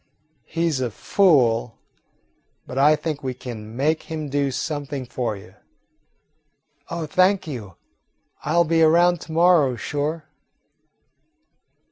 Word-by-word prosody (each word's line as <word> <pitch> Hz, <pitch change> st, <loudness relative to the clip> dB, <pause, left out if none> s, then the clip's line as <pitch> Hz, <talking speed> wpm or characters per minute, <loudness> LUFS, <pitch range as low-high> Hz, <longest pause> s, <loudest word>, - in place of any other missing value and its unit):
He 170 Hz, 0 st, -1 dB
's 150 Hz, -5 st, -1 dB
a 125 Hz, -2 st, -1 dB
fool, 120 Hz, -, +2 dB, 0.9 s
but 130 Hz, -, -4 dB
I 150 Hz, +2 st, +6 dB
think 155 Hz, -1 st, -4 dB
we 130 Hz, -2 st, -4 dB
can 115 Hz, -3 st, -8 dB
make 155 Hz, +5 st, +1 dB
him 155 Hz, -2 st, -4 dB
do 140 Hz, 0 st, 0 dB
something 145 Hz, -1 st, -4 dB
for 120 Hz, -3 st, -3 dB
you." 100 Hz, -, -14 dB, 1.4 s
"Oh, 170 Hz, -1 st, -3 dB
thank 185 Hz, +3 st, +2 dB
you, 115 Hz, -, -7 dB, 0.7 s
I -, -, -1 dB
'll 170 Hz, -, +5 dB
be 165 Hz, 0 st, +1 dB
around 170 Hz, +2 st, +4 dB
to -, -, -10 dB
morrow, 165 Hz, -6 st, +4 dB
sure." 150 Hz, +6 st, -3 dB
150 Hz, 125 wpm, -22 LUFS, 130-165 Hz, 1.4 s, I